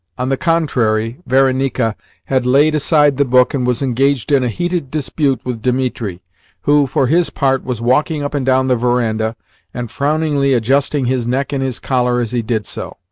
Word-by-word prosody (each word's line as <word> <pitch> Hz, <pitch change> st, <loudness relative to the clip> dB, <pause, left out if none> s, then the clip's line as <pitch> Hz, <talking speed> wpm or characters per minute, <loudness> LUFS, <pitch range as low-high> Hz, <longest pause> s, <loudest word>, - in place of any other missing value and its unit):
On 125 Hz, +1 st, -2 dB
the 135 Hz, -, +2 dB
contrary, 125 Hz, -10 st, 0 dB
Varenika 130 Hz, -3 st, +1 dB, 0.3 s
had 130 Hz, -1 st, 0 dB
laid 145 Hz, +4 st, +4 dB
aside 150 Hz, -2 st, +2 dB
the 140 Hz, -, +4 dB
book, 125 Hz, -1 st, +3 dB
and 125 Hz, -3 st, -1 dB
was 125 Hz, +2 st, 0 dB
engaged 135 Hz, +1 st, 0 dB
in 140 Hz, -2 st, +3 dB
a 125 Hz, -, 0 dB
heated 175 Hz, -, -2 dB
dispute 145 Hz, -3 st, -1 dB
with 125 Hz, -3 st, -4 dB
Dimitri, 125 Hz, -7 st, -2 dB, 0.4 s
who, 145 Hz, -1 st, +3 dB
for 130 Hz, +1 st, +1 dB
his 165 Hz, +6 st, +2 dB
part, 135 Hz, -2 st, 0 dB
was 125 Hz, -3 st, -4 dB
walking 145 Hz, +5 st, +1 dB
up 145 Hz, -, -4 dB
and 145 Hz, -2 st, -1 dB
down 130 Hz, 0 st, +2 dB
the 130 Hz, -1 st, +2 dB
verandah, 115 Hz, -2 st, 0 dB, 0.4 s
and 120 Hz, -2 st, -5 dB
frowningly 145 Hz, -1 st, +1 dB
adjusting 135 Hz, +4 st, +1 dB
his 125 Hz, -1 st, -1 dB
neck 135 Hz, +4 st, -1 dB
in 135 Hz, -, -1 dB
his 130 Hz, -3 st, -2 dB
collar 125 Hz, -2 st, 0 dB
as 115 Hz, -2 st, -2 dB
he 120 Hz, -1 st, 0 dB
did 110 Hz, -1 st, -2 dB
so. -, -, -7 dB
130 Hz, 190 wpm, -17 LUFS, 120-140 Hz, 0.4 s, laid